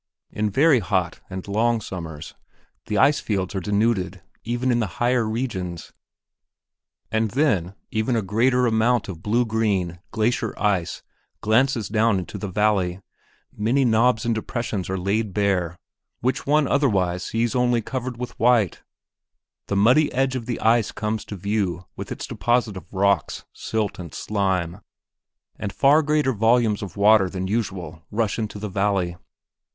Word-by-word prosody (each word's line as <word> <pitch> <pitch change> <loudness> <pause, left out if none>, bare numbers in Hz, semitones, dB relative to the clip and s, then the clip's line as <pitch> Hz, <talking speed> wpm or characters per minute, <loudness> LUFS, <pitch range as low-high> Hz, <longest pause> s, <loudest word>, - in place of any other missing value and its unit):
In 105 0 -1
very 140 +5 +4
hot 90 -2 -1
and 95 0 -6
long 115 +3 +1
summers, 80 -6 -7 0.5
the 105 - -1
ice 145 +8 +4
fields 95 -3 -2
are 95 - -1
denuded 100 -2 0 0.2
even 120 +2 0
in 120 - +2
the 105 -7 -3
higher 120 -2 +2
regions, 95 -8 -4 1.2
and 110 0 +1
then 100 - +1 0.2
a 110 - 0
much 115 -2 0
greater 125 +5 +2
amount 115 0 +2
of 85 -4 -7
blue 115 +5 +1
green 100 -6 0
glacier 115 +3 -1
ice 95 -5 0 0.4
glances 115 0 +2
down 110 -1 +2
into 90 - -5
the 105 - -4
valley, 95 -2 +1 0.6
many 120 +6 +2
knobs 115 0 +3
and 115 - +2
depressions 110 -4 -3
are 95 - -1
laid 100 +2 -1
bare 95 -4 0 0.4
which 130 +3 -1
one 150 0 +3
otherwise 95 -11 +1
sees 115 +1 -1
only 125 -2 +2
covered 125 +1 -4
with 125 0 -7
white, 115 -6 +3 0.9
the 100 - -1
muddy 125 +10 +4
edge 130 +1 +1
of 120 -2 -4
the 120 - -2
ice 115 -1 +3
comes 110 0 -3
to 105 - -7
view 95 -2 -2
with - - -7
its - - -4
deposit 120 -3 0
of 90 -1 -10
rocks, 100 -3 +1
silt, 110 -3 -3
and 85 -5 -8
slime, 95 -3 -1 0.8
and 100 - -3
far 145 +7 +4
greater 150 -3 +1
volumes 115 -1 +2
of 100 -2 -7
water 100 -2 +5
than 95 0 -4
usual 95 -6 -3
rush 110 0 -1
into 105 -1 -4
the 105 +1 -4
valley. 95 -3 0
110 Hz, 155 wpm, -23 LUFS, 95-120 Hz, 1.2 s, water